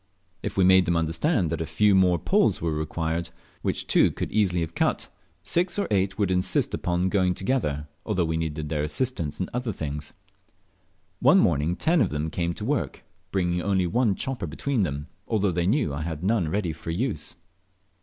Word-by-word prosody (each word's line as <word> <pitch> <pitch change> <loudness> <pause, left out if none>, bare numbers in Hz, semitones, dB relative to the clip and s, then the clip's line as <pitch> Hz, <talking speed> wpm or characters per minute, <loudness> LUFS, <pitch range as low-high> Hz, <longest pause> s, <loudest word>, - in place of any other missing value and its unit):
If - - -5
we 95 - +5
made 95 0 +6
them 85 0 +1
understand 85 - +1
that 85 - -2
a 80 - -3
few 105 -1 +3
more 90 -2 +4
poles - - +2
were 85 0 -1
required, 80 +2 -2 0.3
which - - -2
two - - +4
could - - -4
have - - -9
easily 90 -6 +2
cut, 80 - -1 0.3
six 175 - 0
or 200 - 0
eight 100 -1 +1
would 100 -4 +1
insist 90 0 +1
upon 90 +1 0
going 95 -2 +2
together, 75 - -1 0.2
although 95 -6 0
we 80 0 -1
needed 80 -2 -3
their 75 -2 -1
assistance 75 - -2
in 95 - -1
other 125 -1 -2
things. 75 -4 -5 1.1
One - - +6
morning 80 +1 +2
ten 165 - +3
of 100 - +2
them 75 +1 -3
came 85 +1 -1
to 105 - -4
work, 140 +1 -2 0.3
bringing 90 -2 0
only 95 -1 +1
one 110 +2 +2
chopper 135 +4 -4
between 140 -5 -1
them, 75 -5 -2 0.2
although 105 -4 +1
they 85 0 0
knew 115 - +1
I 70 - -3
had 80 0 -4
none 100 -5 +1
ready 90 -1 -1
for 80 - -9
use. 95 - -2
90 Hz, 190 wpm, -26 LUFS, 80-105 Hz, 1.1 s, made